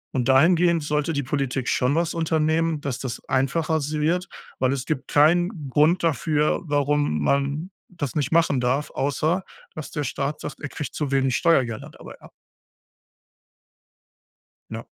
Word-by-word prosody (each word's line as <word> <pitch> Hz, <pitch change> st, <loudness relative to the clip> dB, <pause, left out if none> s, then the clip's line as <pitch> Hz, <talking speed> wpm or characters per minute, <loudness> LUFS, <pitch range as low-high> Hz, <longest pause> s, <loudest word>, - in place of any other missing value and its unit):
und 125 Hz, -1 st, 0 dB
dahingehend 165 Hz, +4 st, +4 dB
sollte 150 Hz, +2 st, -1 dB
die 145 Hz, -, 0 dB
Politik 135 Hz, -1 st, -2 dB
schon 125 Hz, +3 st, +1 dB
was 170 Hz, 0 st, 0 dB
unternehmen, 160 Hz, -1 st, +1 dB
dass 135 Hz, -3 st, -3 dB
das 130 Hz, -3 st, -5 dB
einfacher 155 Hz, +5 st, +1 dB
si 150 Hz, +2 st, -3 dB
wird. 175 Hz, +4 st, 0 dB, 0.3 s
Weil 130 Hz, 0 st, +2 dB
es 135 Hz, -2 st, -4 dB
gibt 155 Hz, -5 st, -3 dB
keinen 165 Hz, +1 st, +2 dB
Grund 155 Hz, +6 st, +3 dB
dafür, 150 Hz, -1 st, +1 dB
warum 145 Hz, -, +1 dB
man 140 Hz, -, 0 dB, 0.2 s
das 160 Hz, -7 st, -5 dB
nicht 145 Hz, -1 st, -1 dB
machen 165 Hz, -5 st, +3 dB
darf, 130 Hz, +4 st, 0 dB
außer 155 Hz, +6 st, 0 dB, 0.3 s
dass 155 Hz, -, -6 dB
der 150 Hz, -, -3 dB
Staat 140 Hz, +3 st, -3 dB
sagt, 145 Hz, -, -7 dB
er 145 Hz, -, -5 dB
kriegt 150 Hz, -, -6 dB
zu 145 Hz, -3 st, -2 dB
wenig 135 Hz, -2 st, +2 dB
Steuergelder 130 Hz, -9 st, +1 dB
dabei -, -, -13 dB
ab. -, -, -15 dB, 2.4 s
Ja. -, -, -7 dB
150 Hz, 150 wpm, -23 LUFS, 135-160 Hz, 2.4 s, dahingehend